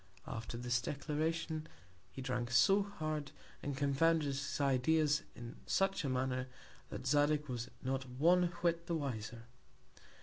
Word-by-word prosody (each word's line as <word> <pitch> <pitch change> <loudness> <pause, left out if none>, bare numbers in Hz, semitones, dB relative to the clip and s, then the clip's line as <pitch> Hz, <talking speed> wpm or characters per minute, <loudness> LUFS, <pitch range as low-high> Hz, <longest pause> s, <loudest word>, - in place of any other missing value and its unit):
After 115 +1 -5
this 120 0 0
Declaration, 155 +3 -2 0.4
he 135 - -7
drank 125 -2 -1
so 195 - +5
hard, 155 -7 -3 0.3
and 140 -2 -3
confounded 150 +3 +3
his 140 +1 -2
Ideas 145 +3 +3
in 120 0 -8
such 195 -3 +2
a 140 - 0
Manner, 130 0 0 0.4
that - - -6
Zadig 145 +2 +3
was 120 -2 -4
not 130 0 -2
one 170 +8 +4 0.2
whit 170 -1 +1
the 170 - 0
wiser. 115 -6 -4
140 Hz, 135 wpm, -36 LUFS, 125-160 Hz, 0.4 s, so